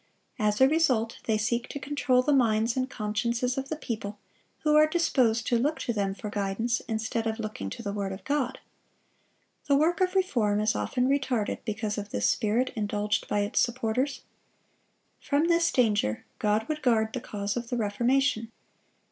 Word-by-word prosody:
As 210 -1 +1
a 265 - +7
result, 265 -7 +1
they 220 -1 +2
seek 235 +3 -1
to 285 - -5
control 265 -3 +1
the 295 - +2
minds 230 -3 +2
and 260 0 -1
consciences 235 +3 -1
of 270 0 -4
the 315 - -2
people, 215 -7 -5 0.4
who 300 -1 +3
are 305 0 +7
disposed 255 -9 +2
to 235 - +2
look 295 +6 0
to 235 - -1
them 200 -2 -1
for 210 0 -6
guidance 210 +4 -1
instead 225 0 -2
of 220 0 -2
looking 215 - -5
to 230 - -7
the 200 -1 -3
word 200 -2 -2
of 190 - -7
God. 280 -3 -1 1.1
The 285 - +4
work 330 +6 +2
of 370 +1 +1
reform 235 - +2
is 215 0 +2
often 250 -1 0
retarded 260 -6 0
because 215 -1 -2
of 205 0 -7
this 100 - 0
spirit 225 - +1
indulged 210 -1 -1
by 205 - +1
its 205 - 0
supporters. 250 +3 0 1.0
From 300 +4 +1
this 335 0 +3
danger, 210 - +1
God 210 +1 +1
would 305 -1 -3
guard 220 -3 +2
the 255 - -3
cause 205 -2 -3
of 240 -1 -4
the 245 - -1
Reformation. 230 +2 +1
230 Hz, 180 wpm, -28 LUFS, 210-270 Hz, 1.1 s, a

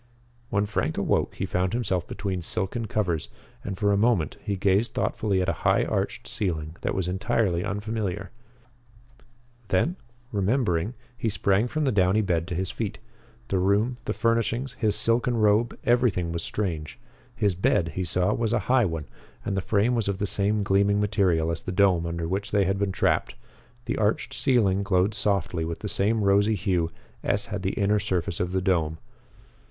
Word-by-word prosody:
When 100 -2 +1
Frank 105 - -1
awoke - - 0
he 95 - -2
found 90 +1 -1
himself 95 -7 -1
between 95 -2 -3
silken 100 +7 -2
covers, 90 -7 -1 0.3
and 95 - -4
for 100 +1 +2
a 100 - +3
moment 105 -8 +2
he 100 - -1
gazed 100 +4 +1
thoughtfully 100 -4 0
at - - -3
a - - +2
high - - +3
arched - - -2
ceiling 80 -5 -3
that - - -1
was 95 -2 -1
entirely 95 -1 0
unfamiliar. 105 -2 -3 1.4
Then, 150 - +1 0.3
remembering, 105 -1 0 0.2
he 115 - -1
sprang 100 +2 +2
from 155 +4 -1
the 135 - +2
downy 95 +1 +3
bed 85 -4 0
to 90 - -3
his 95 +1 -2
feet. 105 -2 -4 0.5
The 95 - +1
room, 105 +6 +2
the - - -1
furnishings, 115 +2 0
his 110 -5 0
silken 120 +1 +2
robe, 110 +2 +3
everything 120 -8 +2
was 85 0 -3
strange. 80 -5 -3 0.4
His 105 -4 +1
bed, 85 -1 +1
he 95 - -3
saw, 90 +1 +1
was 115 -1 0
a 120 - +3
high 125 -3 +5
one, 80 -4 -3 0.4
and 100 - -1
the 95 - 0
frame 105 +5 +2
was 115 -4 0
of 100 -1 -1
the 100 - -1
same 100 +1 0
gleaming 100 +1 +3 0.2
silver 85 -6 +2
as 80 - -3
the - - -5
dome 90 -3 +3
under 85 0 -3
which 95 +4 -2
they 100 -2 +2
had 95 +1 0
been 100 -1 0
trapped. - - 0 0.5
The - - -2
arched 105 0 0
ceiling 105 -8 +2
glowed 100 0 +2
softly 95 -6 0
with 80 0 -4
the 105 - -3
same 105 +2 +1
rosy 100 +2 +3
hue 90 -4 0 0.3
as - - 0
had 105 - -2
the 95 0 -1
inner 105 +1 +2
surface 90 -5 -2
of 90 0 -1
the 95 0 0
dome. 80 -4 +1
100 Hz, 180 wpm, -26 LUFS, 90-110 Hz, 1.4 s, high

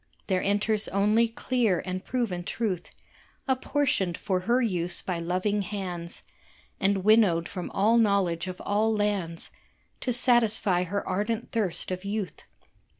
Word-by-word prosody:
There 185 -2 0
enters 210 +1 +1
only 210 +4 +3
clear 230 -4 0
and 185 0 -4
proven 225 -9 -2
truth 185 -3 -3 0.6
Apportioned 260 - 0
for 185 -2 -1
her 245 +2 +4
use 180 -7 -1
by 180 -3 -2
loving 185 +5 0
hands 180 -4 -5 0.6
And 195 -1 +1
winnowed 200 -6 +4
from 180 -2 -6
all 220 +4 +3
knowledge 190 -5 +1
of 185 0 -6
all 215 +2 +2
lands 200 -6 -2 0.5
To 255 - -1
satisfy 225 -7 +3
her 200 +3 -3
ardent 215 +4 -2
thirst 205 -6 0
of 185 0 -4
youth. 200 -1 -4
200 Hz, 135 wpm, -27 LUFS, 180-225 Hz, 0.6 s, her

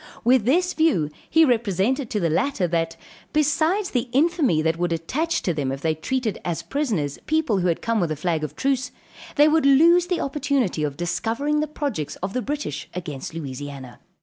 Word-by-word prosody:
With 245 -2 +4
this 360 +8 +2
view 270 - +2 0.2
he 320 0 +5
represented 235 - +1
to 210 - -1
the 170 - +1
latter 235 - +1
that, 165 -1 -1 0.4
besides 315 +6 +1
the 245 -1 -1
infamy 285 - +2
that 165 +1 0
would 175 -1 0
attach 275 - -1
to 175 - 0
them 140 -4 -2
if 135 +1 -5
they 160 0 +1
treated 225 - -2
as 170 -1 -3
prisoners 190 - -2
people 310 -10 +1
who 180 - +1
had 170 - -1
come 230 -1 +1
with 175 -4 0
a - - -1
flag 160 +1 -1
of 150 -1 -5
truce, 265 - 0 0.5
they 295 0 +6
would 315 +1 +3
lose 335 +6 +6
the 360 -1 0
opportunity 275 - 0
of 145 -2 -2
discovering 230 - -1
the 305 - 0
projects 280 - -3
of 190 +2 -5
the 255 - -1
British 295 +3 -4
against 160 -4 -6
Louisiana. 140 -4 -7
230 Hz, 190 wpm, -23 LUFS, -, 0.5 s, they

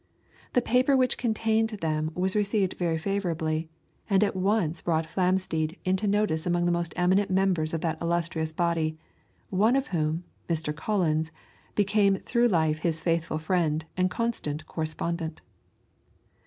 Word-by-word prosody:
The 250 - +3
paper 255 +3 +3
which 255 -1 +2
contained 225 -2 +1
them 155 -2 -1
was 185 +2 0
received 200 -2 +1
very 170 -2 -1
favourably, 165 -4 -1 0.4
and 195 0 +4
at 205 - 0
once 185 -4 +1
brought 160 -1 0
Flamsteed 180 -2 0
into 190 +3 +1
notice 200 -6 +1
among 175 0 +1
the 175 - +2
most 170 -1 -1
eminent 185 +3 +2
members 185 -4 +1
of 165 - -2
that 165 -2 -1
illustrious 170 -1 -1
body, 160 -1 0 0.5
one 215 +6 +3
of 275 +1 0
whom, 160 -1 -1 0.3
Mr. 160 -2 -1
Collins, 160 -4 0 0.4
became 200 -1 +3
through 235 +5 +1
life 160 -6 +2
his 165 -1 0
faithful 165 -2 0
friend 160 -1 0
and 185 0 +2
constant 180 -9 -2
correspondent. 160 +1 -3
175 Hz, 140 wpm, -27 LUFS, 160-200 Hz, 0.5 s, and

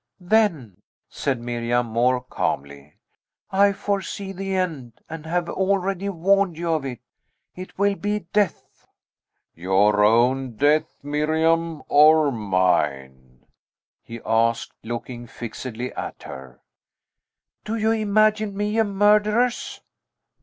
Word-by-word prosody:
"Then," 175 - 0 0.3
said 135 -4 -2
Miriam 120 0 -1
more 120 +2 +1
calmly, 70 - -4 0.6
"I 200 +1 +4
foresee 195 0 -3
the 195 0 -4
end, 155 -11 -3
and 160 0 -8
have 175 +1 -1
already 195 0 -1
warned 195 -1 +1
you 170 -1 -1
of 155 -3 -1
it. 125 -3 -6 0.5
It 185 +1 -10
will 200 +1 +2
be 205 -1 -3
death!" 205 -4 -2 0.7
"Your 100 +4 +2
own 120 +3 +2
death, 145 +6 +1
Miriam, 160 +2 0
or 150 0 +5
mine?" 70 - -1 0.6
he 115 0 -9
asked, 115 +1 +1
looking 120 +1 -6
fixedly 120 +1 -6
at - - -7
her. 65 -1 -11 1.0
"Do 220 - -3
you 220 0 +1
imagine 215 -1 +1
me 210 +2 0
a - - +5
murderess?" 210 +4 +1
155 Hz, 110 wpm, -23 LUFS, -, 1.0 s, or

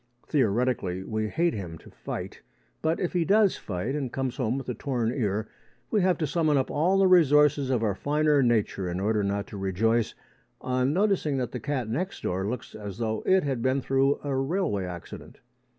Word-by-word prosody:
Theoretically, 115 - 0
we 110 +1 -2
hate 170 +6 +1
him 90 -6 -6
to - - -16
fight, - - -7 0.4
but, 160 +1 0
if 180 - -2
he 175 -2 +2
does 205 +2 +4
fight 105 +7 -4
and 140 -4 -3
comes 130 0 -3
home 125 -1 0
with 135 - -6
a 125 - -2
torn 120 -3 -1
ear, 110 -4 -1 0.4
we 210 - +3
have 185 -1 +2
to 160 - -1
summon 155 -1 +1
up 130 - 0
all 175 +6 +2
the 195 - +4
resources 150 -6 +5
of 125 -4 +1
our 105 -2 +1
finer 150 +5 +2
nature 110 -6 +1
in 90 +1 -3
order 105 +1 +1
not 100 +1 -1
to 100 - -9
rejoice 110 +4 0 0.4
on 130 +1 0
noticing 185 -5 +1
that 125 -2 -2
the - - -4
cat 140 -5 -2
next 170 - -3
door 95 +2 -1
looks 125 +2 -5
as 100 -3 -7
though 110 -2 -2
it 190 0 +4
had 135 -4 -2
been 130 +2 +1
through 135 +1 +1
a 140 -2 -2
railway 135 - 0
accident. 90 -1 -9
130 Hz, 200 wpm, -27 LUFS, 110-150 Hz, 0.4 s, resources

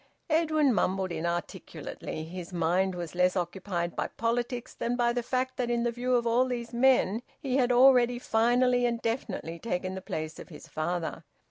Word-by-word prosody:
Edwin 310 -4 +3
mumbled 190 -2 0
inarticulately. 170 -1 -4
His 175 +2 -7
mind 180 +2 +1
was 175 -2 -5
less 180 +1 +2
occupied 175 -1 -2
by - - -1
politics 240 +2 -2
than 240 +1 -2
by 240 -1 +2
the 245 - 0
fact 255 +2 -2
that 245 -2 -1
in 235 -1 +1
the 240 - +1
view 250 +2 0
of 240 -1 +1
all 235 +2 +3
these 240 -2 -4
men 240 -4 +3 0.2
he 265 -3 -1
had 250 -2 +3
already 245 -1 +6
finally 245 +1 +3
and 235 -1 -1
definitely 210 -8 -3
taken 185 -3 -2
the 190 - -5
place 155 -3 -5
of - - -10
his 150 -4 -11
father. 165 +1 -3
230 Hz, 175 wpm, -29 LUFS, 180-245 Hz, 0.2 s, already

